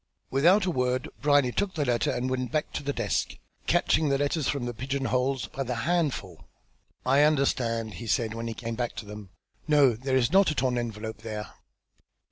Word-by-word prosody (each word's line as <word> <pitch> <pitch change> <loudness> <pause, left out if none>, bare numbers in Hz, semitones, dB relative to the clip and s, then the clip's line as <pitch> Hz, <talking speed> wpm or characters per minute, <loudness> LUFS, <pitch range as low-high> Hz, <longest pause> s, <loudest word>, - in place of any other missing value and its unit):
Without 175 +9 +4
a 180 - +1
word 125 -3 0
Brierly 145 -3 +4
took 195 +6 -1
the 150 -3 0
letter 120 -2 +1
and 125 +1 -1
went 130 -1 -2
back 155 0 -1
to - - -3
the 140 0 -2
desk, 120 -7 -1 0.3
catching 155 -2 +2
the 140 - +2
letters 145 +1 0
from 140 -4 -1
their 120 - -3
pigeon 135 +4 -3
holes 130 +2 0
by 135 - -7
the 125 -2 -2
handful. 145 - -1 0.6
"I 135 +3 +4
understand," 120 -7 +1
he 120 - -8
said, 110 0 0
when 115 +1 -4
he 115 - -4
came 115 +1 -5
back 120 +1 -3
to - - -6
them. 105 -1 -9 0.4
"No, 145 -5 +5
there 130 +4 -2
is 125 -2 +2
not 195 +1 +5
a 155 - -2
torn 125 -2 +1
envelope 110 -2 -5
there." 110 -1 -6
130 Hz, 200 wpm, -27 LUFS, 115-145 Hz, 0.6 s, No